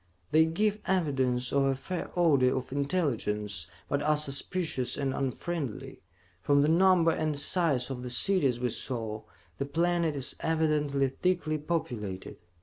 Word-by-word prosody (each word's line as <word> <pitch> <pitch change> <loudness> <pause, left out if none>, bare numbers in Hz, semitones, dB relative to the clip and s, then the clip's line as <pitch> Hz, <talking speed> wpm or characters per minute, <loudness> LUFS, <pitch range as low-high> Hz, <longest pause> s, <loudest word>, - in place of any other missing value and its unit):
They 160 +1 +5
give 210 +6 0
evidence 130 -9 0
of 140 - +3
a 135 0 +2
fair 175 +7 -5
order 140 -8 +3
of 130 - -5
intelligence, 115 - -1 0.2
but 140 - -1
are 150 +1 +2
suspicious 150 -1 -1
and 135 -2 -1
unfriendly. 135 -1 -4 0.4
From 140 +6 +3
the 150 - +2
number 175 0 +5
and 155 -2 -1
size 140 -5 +1
of 125 -2 -5
the 125 - -5
cities 130 -1 +2
we 125 0 0
saw, 110 -2 -4 0.4
this 140 - -2
planet 170 0 +1
is 135 -2 -1
evidently 150 -4 +1
thickly 155 +2 -1
populated. 125 - -4
145 Hz, 145 wpm, -29 LUFS, 130-165 Hz, 0.4 s, They